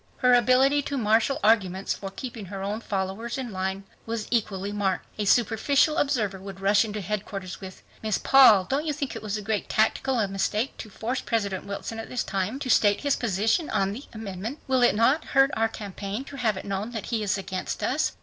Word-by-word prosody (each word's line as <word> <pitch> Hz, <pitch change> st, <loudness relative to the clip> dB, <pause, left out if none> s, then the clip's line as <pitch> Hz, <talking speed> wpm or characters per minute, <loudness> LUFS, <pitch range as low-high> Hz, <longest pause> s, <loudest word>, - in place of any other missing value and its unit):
Her 250 Hz, -1 st, +4 dB
ability 255 Hz, +4 st, +4 dB
to 285 Hz, 0 st, -4 dB
marshal 225 Hz, +3 st, +2 dB
arguments 195 Hz, -3 st, +2 dB
for 195 Hz, -, -6 dB
keeping 230 Hz, +1 st, -7 dB
her 195 Hz, +1 st, -6 dB
own 210 Hz, +3 st, -3 dB
followers 200 Hz, +4 st, -3 dB
in 255 Hz, -3 st, -4 dB
line 190 Hz, +1 st, -3 dB, 0.2 s
was 225 Hz, -1 st, -3 dB
equally 205 Hz, -4 st, -1 dB
marked. 195 Hz, -3 st, -1 dB
A 210 Hz, -, 0 dB
superficial 245 Hz, +8 st, +3 dB
observer 225 Hz, -, 0 dB
would 195 Hz, 0 st, -9 dB
rush 200 Hz, +2 st, +4 dB
into 210 Hz, -1 st, -4 dB
headquarters 195 Hz, -2 st, -5 dB
with, 190 Hz, -1 st, -10 dB, 0.2 s
"Miss 215 Hz, -2 st, 0 dB
Paul, 255 Hz, -8 st, +7 dB
don't 285 Hz, -, -1 dB
you 300 Hz, -, 0 dB
think 280 Hz, -2 st, -4 dB
it -, -, -6 dB
was 215 Hz, 0 st, -3 dB
a 210 Hz, -, -6 dB
great 215 Hz, 0 st, -2 dB
tactical 225 Hz, +1 st, +1 dB
mistake 210 Hz, +5 st, -1 dB
to 220 Hz, -, -8 dB
force 235 Hz, +5 st, -3 dB
President 200 Hz, -5 st, -2 dB
Wilson 200 Hz, +3 st, -5 dB
at 225 Hz, -, -7 dB
this 250 Hz, -, -1 dB
time 195 Hz, +5 st, -2 dB
to 270 Hz, -, -3 dB
state 205 Hz, -2 st, +4 dB
his 285 Hz, -1 st, +2 dB
position 225 Hz, -, 0 dB
on 195 Hz, 0 st, +1 dB
the 260 Hz, +7 st, -8 dB
amendment? 220 Hz, +3 st, -6 dB
Will 260 Hz, -1 st, +2 dB
it 240 Hz, -5 st, +4 dB
not 260 Hz, +8 st, +3 dB
hurt 270 Hz, +1 st, +3 dB
our 225 Hz, 0 st, +2 dB
campaign 205 Hz, +2 st, -5 dB
to 275 Hz, 0 st, -10 dB
have 220 Hz, -6 st, 0 dB
it -, -, -7 dB
known 200 Hz, +4 st, -3 dB
that 225 Hz, -, -4 dB
he 225 Hz, -, +1 dB
is 205 Hz, -1 st, 0 dB
against 190 Hz, -1 st, -4 dB
us?" -, -, +1 dB
215 Hz, 205 wpm, -26 LUFS, 195-250 Hz, 0.2 s, Paul